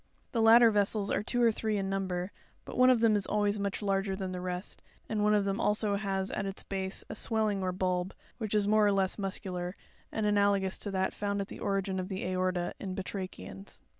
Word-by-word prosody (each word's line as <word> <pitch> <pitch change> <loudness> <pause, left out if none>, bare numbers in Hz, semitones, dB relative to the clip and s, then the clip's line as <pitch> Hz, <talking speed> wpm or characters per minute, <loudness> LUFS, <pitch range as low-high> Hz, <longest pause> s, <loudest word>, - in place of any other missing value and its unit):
'The 235 -4 0
latter 230 +1 +8
vessels 205 0 +1
are - - +1
two 245 +3 0
or 230 - +6
three 215 -1 -1
in 195 -1 -1
number; 190 -1 -2 0.3
but - - -8
one 255 0 +6
of 250 -3 +4
them 225 -2 +5
is 200 -2 0
always 205 0 +1
much 200 +1 -2
larger 195 -1 0
than 190 -1 -4
the 180 -1 -4
rest, 180 +1 -3 0.3
and 215 -2 -1
one 210 0 +4
of 205 -1 +2
them 195 +2 -1
also 210 -1 +1
has 195 -1 -2
at - - -2
its 195 - -6
base 190 -1 -3
a - - -6
swelling 215 -3 0
or 185 -1 0
bulb, 180 0 -1 0.2
which 215 -2 -2
is 205 -1 +2
more 215 0 +4
or - - +4
less 195 0 +1
muscular, 185 -2 -3 0.4
and 220 - -1
analogous 200 -2 +2
to 205 - -2
that 190 -1 0
found 200 -1 -2
at 200 - -3
the - - -8
origin 195 -1 -1
of 185 +1 -4
the 190 -1 -4
aorta 185 -1 -1
in 190 -2 -4
batrachians. 185 - -7
195 Hz, 225 wpm, -30 LUFS, 190-210 Hz, 0.4 s, latter